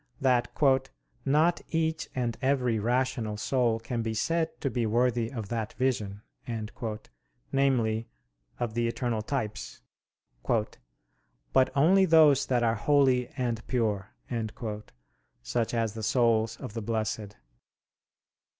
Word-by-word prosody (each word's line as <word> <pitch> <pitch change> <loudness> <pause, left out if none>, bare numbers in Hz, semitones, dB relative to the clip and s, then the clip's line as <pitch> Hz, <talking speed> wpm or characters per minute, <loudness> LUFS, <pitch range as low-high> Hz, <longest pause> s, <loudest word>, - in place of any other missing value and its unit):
that 125 -2 +3 0.8
"not 155 +5 +3
each 160 -1 -1
and 120 -3 -1
every 130 -4 +1
rational 120 -1 0
soul 120 0 +1
can 115 +1 -3
be 110 0 -2
said 165 +8 +1
to - - -2
be 125 -3 -1
worthy 120 +1 +1
of 110 -6 -5
that 115 -2 -3
vision," 105 -6 -1 1.3
namely, 115 -5 +1 0.5
of 120 -3 -2
the 120 0 0
eternal 115 -1 -1
types, 110 - -4 1.7
"but 130 -1 +5
only 185 +7 +5
those 155 -5 +5
that 125 -2 +2
are 115 -1 +3
holy 130 +1 +3
and 120 -3 -1
pure," 105 -5 0 1.3
such 115 - -1
as 115 -3 0
the 110 - -6
souls 115 -1 +2
of - - -8
the 115 - -4
blessed. 110 -1 -3
120 Hz, 115 wpm, -28 LUFS, 110-130 Hz, 1.7 s, but